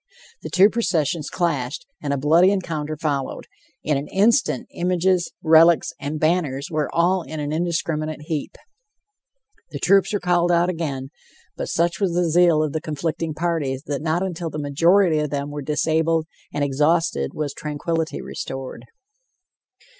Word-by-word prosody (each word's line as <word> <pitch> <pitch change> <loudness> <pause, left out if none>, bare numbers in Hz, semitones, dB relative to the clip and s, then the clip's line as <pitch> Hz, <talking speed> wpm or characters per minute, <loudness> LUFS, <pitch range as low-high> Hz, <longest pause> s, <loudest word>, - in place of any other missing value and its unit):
The - - -6
two 195 +3 +5
processions 165 - 0
clashed, 165 - -2 0.2
and 145 - -2
a 140 - 0
bloody 160 +7 +4
encounter 155 -6 -2
followed; 145 -3 -2 0.4
in 150 -2 +1
an 140 - -4
instant 225 +7 +2
images, 180 0 +1
relics 165 +1 +5
and 150 +2 -4
banners 155 -4 0
were 155 -2 -1
all 180 +2 +2
in 155 -2 -7
an 145 0 -3
indiscriminate 155 -2 -2
heap. 150 -2 -4 1.1
The - - -6
troops 195 -1 +3
were 205 - 0
called 175 -1 +2
out 175 +1 +3
again, 140 -6 -4 0.5
but - - -4
such 170 0 0
was 185 -4 0
the 175 -1 +2
zeal 170 -2 +4
of 150 - -2
the 155 - -2
conflicting 160 0 -3
parties 155 -5 -2
that 145 -2 -3
not 160 +3 0
until 175 -3 -3
the 150 - -6
majority 165 +4 +3
of 150 -1 -1
them 140 0 -3
were 145 0 -5
disabled 160 +2 +1 0.3
and 145 - -1
exhausted, 145 - +1
was 150 -2 -3
tranquility 160 +2 -3
restored. 130 -2 -6
160 Hz, 155 wpm, -22 LUFS, 150-175 Hz, 1.1 s, two